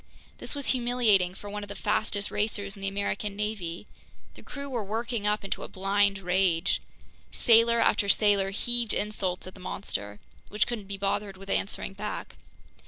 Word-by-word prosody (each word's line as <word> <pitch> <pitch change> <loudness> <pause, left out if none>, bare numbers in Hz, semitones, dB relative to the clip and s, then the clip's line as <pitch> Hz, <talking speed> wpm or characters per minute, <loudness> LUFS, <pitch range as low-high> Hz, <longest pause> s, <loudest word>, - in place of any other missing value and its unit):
This - - -1
was 285 -1 -1
humiliating 235 -7 +3
for 205 - -10
one 205 +1 -4
of 205 - -8
the 200 - -6
fastest 205 +1 0
racers 205 -1 -1
in 200 - -12
the 195 - -1
American 200 +1 -2
navy. 205 -4 -3 0.5
The - - -13
crew 280 0 -7
were 245 -5 -2
working 225 +1 -2
up 210 +1 +1
into - - -3
a - - -5
blind 200 +1 +2
rage. 180 -1 +2 0.5
Sailor 235 0 +5
after 200 -3 +3
sailor 200 -2 +4
heaved 235 +2 -1
insults 195 -4 -2
at 185 - -9
the - - -14
monster, 105 - -4 0.3
which 210 +1 +2
couldn't 220 -5 -5
be 200 0 -5
bothered 195 0 -1
with 195 +1 -7
answering 195 - -1
back. 210 +2 -5
200 Hz, 170 wpm, -28 LUFS, 195-220 Hz, 0.5 s, Sailor